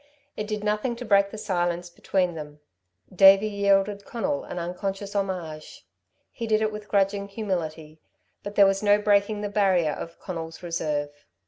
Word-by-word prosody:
It 210 - -4
did 210 -1 -3
nothing 210 +4 0
to 245 +1 -7
break 200 -2 +4
the 220 - -8
silence 175 -4 -2
between 180 0 0
them. 150 -2 -9 0.5
Davey 195 +2 +7
yielded 200 0 +1
Conal 280 +7 -2
an - - -7
unconscious 195 +3 -4
homage. 180 -6 -4 0.5
He 230 - -5
did 215 -1 +3
it 220 0 0
with 210 0 -8
grudging 200 0 +1
humility; 165 -7 -4 0.4
but 205 0 -7
there 200 - +7
was 195 0 +2
no 205 -1 +5
breaking 205 0 +2
the 210 - -2
barrier 190 -6 +2
of 165 +2 -7
Conal's 165 -3 -7
reserve. 150 -4 -2
195 Hz, 160 wpm, -25 LUFS, 175-210 Hz, 0.5 s, Davey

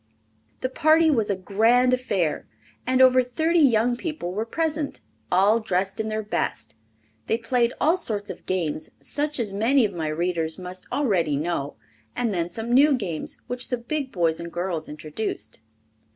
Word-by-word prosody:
The 255 - -1
party 315 +4 +4
was 225 -7 +1
a 200 - +1
grand 225 +7 +3
affair 200 -11 -1 0.4
and 260 0 +5
over 255 0 +6
thirty 315 +8 +1
young 240 -4 +4
people 300 - -4
were 215 +4 -2
present, 310 +2 -2 0.3
all 200 +5 +4
dressed 195 -1 -1
in 220 0 -1
their 215 0 -2
best. 115 - -3 0.5
They 225 - +2
played 235 0 +1
all 325 +4 +3
sorts 210 - -3
of - - -12
games 165 -5 -2
such 295 -1 -2
as 210 -4 0
many 235 +5 +3
of 200 - -3
my 160 -3 -3
readers 165 0 -1
must 185 0 -8
already 180 - +1
know, 150 -2 -2 0.4
and 230 -4 0
then 170 -2 -1
some 225 +6 -3
new 280 +3 +6
games 180 -10 -4
which 245 0 -4
the 250 - 0
big 265 +3 -3
boys 165 -3 +1
and 170 0 -6
girls 175 -2 -3
introduced. 155 - -5
220 Hz, 165 wpm, -24 LUFS, 180-255 Hz, 0.5 s, over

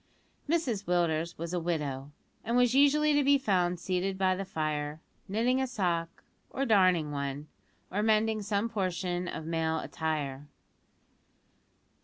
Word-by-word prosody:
Mrs 260 -12 0
Willders 170 -1 0
was 170 +2 -5
a 180 - +1
widow, 145 -5 -3 0.3
and 235 +2 0
was 245 -1 +4
usually 295 +2 +4
to 290 0 +3
be 280 +1 +5
found 180 -8 +1
seated 185 +2 -1
by 190 -1 +2
the 195 +1 -4
fire, 150 -2 -3 0.3
knitting 235 +6 +1
a 265 - 0
sock, 175 -8 -2 0.3
or 275 - -2
darning 185 - +3
one, 140 +1 -4 0.4
or 205 - 0
mending 220 0 +2
some 205 +2 0
portion 180 -4 -2
of 160 - -5
male 160 0 0
attire. 150 -4 -3
180 Hz, 140 wpm, -30 LUFS, 160-220 Hz, 0.4 s, be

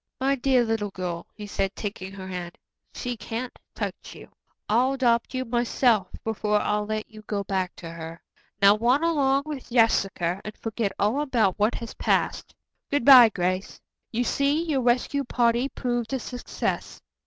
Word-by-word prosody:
"My 270 +1 +2
dear 260 -1 +3
little 225 -2 -1
girl," 180 -3 -5
he 210 - -8
said, 195 -1 -2
taking 195 -2 -5
her 190 -1 -8
hand, 180 -2 -6 0.3
"she 245 -1 -4
can't 235 +2 -5 0.2
touch - - -5
you. - - -12 0.4
I'll 250 +5 +3
adopt 245 -2 +1
you 255 0 -1
myself 235 -3 +2 0.2
before 210 -1 0
I'll 210 0 -1
let 215 0 -3
you 215 -1 -13
go 205 -1 -3
back 190 -2 -2
to 165 -1 -8
her. 165 0 -8 0.4
Now 200 +1 +7
run 250 +7 +3
along 280 -4 +2
with 295 -4 -7
Jessica 195 -6 +2
and 215 - -8
forget 225 -2 -2
all 220 +8 +1
about 230 -10 +1
what 210 +3 +2
has 230 - -6
passed. - - -1 0.3
Good 285 -4 0
bye, 255 -5 +10
Grace. 185 0 -2 0.3
You 240 +2 0
see, 280 +5 +1
your 300 -6 0
rescue 250 +3 +1
party 240 +1 +1
proved 240 -2 -3
a 265 - 0
success. 245 +1 -4
230 Hz, 165 wpm, -25 LUFS, 200-255 Hz, 0.4 s, bye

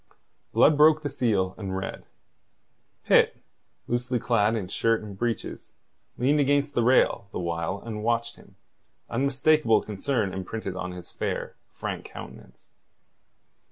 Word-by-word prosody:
Blood 150 -1 +5
broke 155 +1 +6
the 145 - -1
seal, 100 -8 0
and 95 -2 -3
read. 95 - -5 1.0
Pitt, - - +4 0.5
loosely 125 +1 -1
clad 115 -2 +2
in 100 -5 -3
shirt 115 +3 +1
and 105 -2 -8
breeches, 115 +3 -4 0.4
leaned 140 +5 +2
against 145 +1 +2
the 120 - +2
rail 120 -4 +3
the - - -5
while 85 +2 -2
and 110 -2 -5
watched 115 +1 0
him, - - -19 0.6
unmistakable 140 0 +3
concern 105 -1 -1
imprinted 95 +1 -5
on 90 0 -4
his 90 -1 -10
fair, - - -3 0.2
frank - - -5
countenance. - - -12
115 Hz, 130 wpm, -26 LUFS, 100-135 Hz, 1.0 s, broke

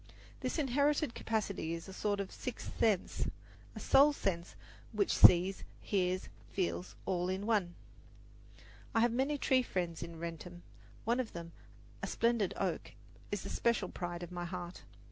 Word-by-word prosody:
This - - -2
inherited 285 -1 +2
capacity 200 -7 -1
is 165 - -8
a 190 - -8
sort 205 +1 0
of 200 - -3
sixth 255 - -6
sense 210 -5 +2 0.5
a - - -5
soul 285 +2 +6
sense 175 -9 -2 0.4
which 205 -2 +2
sees, 185 +2 +7 0.2
hears, 185 -2 0 0.2
feels, 185 -1 -2
all 180 -1 0
in 190 +2 -2
one. 205 -6 +1 1.2
I 225 - +5
have 240 0 +4
many 270 +4 +1
tree 260 -2 +3
friends 175 -8 -2
in 170 -1 -6
Wrentham. 170 +1 -7 0.4
One 235 +3 +2
of 250 -4 -2
them, 170 -1 -7 0.5
a - - -2
splendid 230 -5 +1
oak, 180 -5 -2 0.4
is 205 -2 -2
the - - -5
special 230 -6 +1
pride 175 -1 -4
of 175 - -7
my 175 -1 -4
heart. 175 0 -6
190 Hz, 155 wpm, -34 LUFS, 175-230 Hz, 1.2 s, sees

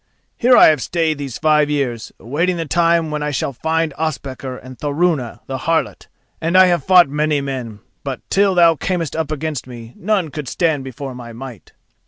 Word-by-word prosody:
Here 250 0 +4
I - - +8
have 150 -4 +1
stayed 160 +2 -1
these 135 -4 -5
five 150 -1 +3
years, 130 -6 -2
awaiting 165 +9 -1
the 165 - -3
time 165 0 +2
when 150 0 -3
I 150 - -1
shall 140 -1 -2
find 160 +4 -1
Ospakar 135 -4 -4
and 130 0 -11
Thorunna 145 -4 -1
the 130 -1 -5
harlot, 165 +3 -1 0.3
and 170 +3 +2
I 185 - +8
have 175 -5 +1
fought 180 -1 +6
many 150 +1 0
men, 125 -6 -5 0.2
but, 135 -2 -4
till 195 -1 +3
thou 170 -2 +6
camest 170 -1 -2
up 160 -2 -2
against 150 -5 -3
me, 120 -2 -10
none 190 -3 0
could 150 -2 -6
stand 160 -3 0
before 135 +1 -7
my 120 -2 -9
might." 120 -3 -10
150 Hz, 190 wpm, -19 LUFS, 130-165 Hz, 0.3 s, I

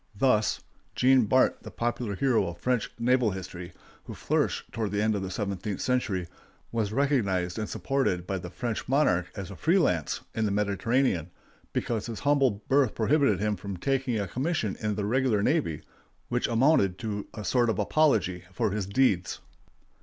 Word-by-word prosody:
Thus 110 -1 +2 0.3
Jean 130 -1 +5
Bart, 130 +5 +3
the - - -9
popular 120 -3 -2
hero 120 -4 +2
of 85 0 -6
French 125 +4 0
naval 125 -1 +2
history, 95 -2 -7 0.3
who - - -8
flourished - - -1
toward 110 -3 -2
the 100 +1 -1
end 110 +1 +2
of 100 - -2
the 95 - -4
seventeenth 100 0 -3
century, 100 -9 0 0.4
was 110 -3 -1
recognized 110 -10 0
and 105 - -3
supported 130 -11 -1
by 95 0 -2
the 90 - -7
French 115 +4 -4
monarch 125 - +2
as 100 -1 -6
a - - -8
free 165 - +2
lance 90 - +1
in 110 - 0
the - - +1
Mediterranean, 100 - +1 0.4
because 115 -2 -2
his 115 -2 -6
humble 135 -7 +2
birth 135 -4 +3
prohibited 140 +5 +2
him 105 0 0
from 100 -1 -6
taking 130 +1 0
a 100 - -2
commission 130 - -1
in 105 -1 -1
the 105 -1 -2
regular 120 -2 +1
navy, 140 - 0 0.5
which 125 0 0
amounted 115 - +3
to 105 -2 -4
a 105 -2 -6
sort 120 +6 +2
of 110 - 0
apology 105 - +2
for 110 +2 0
his 100 -2 -2
deeds. 100 -5 +1
110 Hz, 175 wpm, -28 LUFS, 95-130 Hz, 0.5 s, Jean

